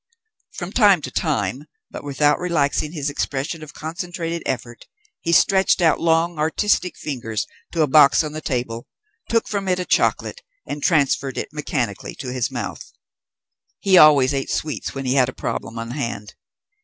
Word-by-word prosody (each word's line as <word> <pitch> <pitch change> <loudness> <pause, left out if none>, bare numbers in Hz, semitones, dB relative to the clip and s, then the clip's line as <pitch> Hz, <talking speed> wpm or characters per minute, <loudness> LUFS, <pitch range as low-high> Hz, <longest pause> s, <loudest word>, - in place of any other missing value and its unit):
From - - -6
time - - +4
to - - -5
time, - - -1 0.3
but - - -8
without 145 +1 +2
relaxing 155 -4 0
his 150 -4 -3
expression 145 +2 -3
of 155 -2 -11
concentrated 170 +1 -4
effort, 120 -2 -5 0.3
he 165 - -2
stretched 190 +3 +4
out 165 -3 +3
long 165 0 +1
artistic 180 +4 +1
fingers 115 -7 -4 0.3
to 165 -2 +2
a - - +1
box 140 +1 +6
on 155 - -4
the 155 - -5
table, 120 -4 -3 0.4
took 230 -1 +1
from 200 -2 -3
it 180 -1 +2
a 180 - -3
chocolate, - - 0 0.2
and 145 - -5
transferred 140 -4 +1
it - - -4
mechanically 120 -8 -3
to 125 -2 -6
his 125 -3 -1
mouth. - - -6 0.9
He 195 -2 +3
always 145 -5 +7
ate 135 -1 -2
sweets 150 -2 -3
when 135 0 -4
he 130 - +1
had 130 -2 +3
a - - -7
problem 115 +1 -4
on 115 +1 -5
hand. 115 -7 -4
150 Hz, 165 wpm, -21 LUFS, 130-170 Hz, 0.9 s, always